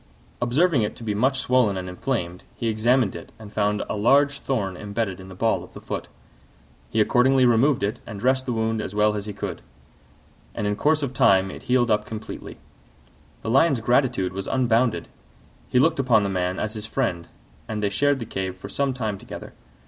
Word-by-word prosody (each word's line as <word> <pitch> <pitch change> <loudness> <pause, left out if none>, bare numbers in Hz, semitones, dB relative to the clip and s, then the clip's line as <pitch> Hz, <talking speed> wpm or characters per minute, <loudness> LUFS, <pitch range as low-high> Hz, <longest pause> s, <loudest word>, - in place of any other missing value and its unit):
Observing 135 +4 +3
it 105 - -2
to - - -11
be 105 -2 -1
much 130 +6 +2
swollen 125 -7 +2
and 90 0 -5
inflamed, 90 -2 -3
he 115 - -3
examined 115 0 +2
it 85 - -9
and 105 -2 -12
found 105 0 +1
a - - -3
large 140 +6 +3
thorn 100 -9 -2
embedded 100 0 -3
in 95 - -10
the 95 - -10
ball 110 +4 +1
of - - -15
the - - -7
foot. - - -5 0.8
He 110 - -1
accordingly 130 +4 +4
removed 120 +2 +3
it 100 +2 -1
and 100 - -7
dressed 130 +3 +1
the - - 0
wound 110 -1 0
as 105 - -6
well 105 0 +3
as 105 0 -4
he - - -3
could: 100 -3 -5 0.9
and 105 - -2
in 105 0 0
course 150 +6 +2
of 135 -2 -2
time 95 -5 +4
it - - -9
healed 125 -2 +3
up 105 - +1
completely. 110 -1 -7 0.9
The 110 - -2
Lion's 135 0 +4
gratitude 115 -6 +1
was 95 +1 -5
unbounded; 125 -2 +1 0.6
he - - +1
looked 155 +4 +3
upon 120 -5 +4
the 100 - -1
man 90 -1 -1
as 110 0 -2
his 110 -1 -6
friend, 100 -10 -2 0.4
and 105 -1 -3
they 100 - +2
shared 145 +7 +2
the 120 - -5
cave 95 -3 -4
for 95 - -9
some 140 -2 -1
time 110 -6 -3
together. - - -9
110 Hz, 200 wpm, -24 LUFS, 100-130 Hz, 0.9 s, accordingly